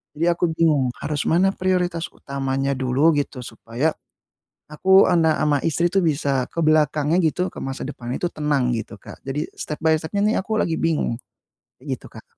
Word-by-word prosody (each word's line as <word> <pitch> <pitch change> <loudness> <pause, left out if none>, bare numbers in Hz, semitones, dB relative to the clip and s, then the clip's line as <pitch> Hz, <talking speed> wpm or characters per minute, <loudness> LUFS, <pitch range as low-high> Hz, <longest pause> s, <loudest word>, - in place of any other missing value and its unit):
Jadi 160 - 0
aku 170 - 0
bingung 145 -7 +2
harus 150 -1 -2
mana 185 +4 +3
prioritas 180 -3 -1
utamanya 135 0 -2
dulu, 130 +5 +2
gitu, 140 -2 -3
supaya 115 +6 -2 0.8
aku, 190 +5 +5
anak, 160 -2 +3
sama 145 -1 +2
istri 165 +2 +1
tu 195 - +3
bisa 140 -6 0
ke - - -10
belakangnya, 155 +1 +3
gitu, 180 +3 0
ke - - -9
masa 135 0 -4
depannya 125 -3 -5
itu - - -1
tenang 145 -5 0
gitu, 110 -2 -5
Kak. - - -12
Jadi 140 +3 -3
step 150 - -5
by 160 - +5
step-nya 180 +6 -2
nih 215 - +2
aku 215 +3 -3
lagi 165 -5 +1
bingung, 150 -7 0 0.6
kayak - - -14
gitu, - - -13
Kak. - - -12
150 Hz, 180 wpm, -22 LUFS, 135-170 Hz, 0.8 s, aku